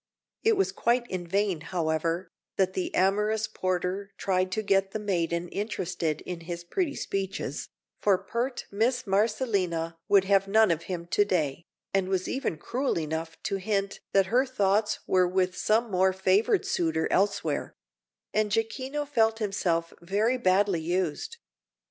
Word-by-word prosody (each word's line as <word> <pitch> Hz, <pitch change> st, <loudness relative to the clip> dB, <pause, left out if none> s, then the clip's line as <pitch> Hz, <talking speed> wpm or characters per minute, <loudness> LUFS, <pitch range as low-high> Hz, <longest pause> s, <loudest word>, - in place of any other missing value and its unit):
It 445 Hz, -2 st, +4 dB
was 390 Hz, -, +2 dB
quite 240 Hz, +1 st, +1 dB
in 180 Hz, -2 st, -3 dB
vain, 195 Hz, -2 st, 0 dB
however, 165 Hz, +1 st, -1 dB, 0.3 s
that 190 Hz, -1 st, +1 dB
the 185 Hz, -, -2 dB
amorous 210 Hz, +3 st, +2 dB
porter 185 Hz, +1 st, -2 dB
tried 185 Hz, -1 st, 0 dB
to 220 Hz, -, -1 dB
get 195 Hz, -1 st, +2 dB
the -, -, 0 dB
maiden 175 Hz, -4 st, -1 dB
interested 180 Hz, -6 st, -2 dB
in 180 Hz, -2 st, -6 dB
his 170 Hz, +1 st, -6 dB
pretty 295 Hz, -, -1 dB
speeches, 195 Hz, 0 st, -3 dB, 0.3 s
for 200 Hz, -3 st, +4 dB
pert 245 Hz, +6 st, -3 dB
Miss 245 Hz, +5 st, +1 dB
Marcellina 195 Hz, -5 st, 0 dB
would 200 Hz, -2 st, +5 dB
have 195 Hz, 0 st, +3 dB
none 220 Hz, -1 st, +5 dB
of 165 Hz, 0 st, -1 dB
him 175 Hz, -2 st, -3 dB
to 190 Hz, +4 st, +3 dB
day, 165 Hz, -5 st, -1 dB, 0.3 s
and 190 Hz, -1 st, +1 dB
was 185 Hz, -1 st, 0 dB
even 260 Hz, -, -2 dB
cruel 255 Hz, -, -1 dB
enough 160 Hz, +1 st, -3 dB
to 195 Hz, -, -1 dB
hint 195 Hz, 0 st, -1 dB
that 195 Hz, -1 st, +4 dB
her 255 Hz, +2 st, +5 dB
thoughts 210 Hz, -5 st, +1 dB
were 185 Hz, -1 st, +3 dB
with 185 Hz, 0 st, +1 dB
some 220 Hz, +4 st, +1 dB
more 185 Hz, 0 st, +3 dB
favoured 195 Hz, -, +2 dB
suitor 160 Hz, -2 st, 0 dB
elsewhere; 200 Hz, +1 st, 0 dB, 0.6 s
and 215 Hz, -1 st, +1 dB
Jacquino 260 Hz, +7 st, -1 dB
felt 225 Hz, -5 st, +2 dB
himself 180 Hz, -6 st, -1 dB
very 210 Hz, +8 st, +1 dB
badly 190 Hz, -3 st, +3 dB
used. 175 Hz, -, -2 dB
195 Hz, 150 wpm, -28 LUFS, 175-215 Hz, 0.6 s, would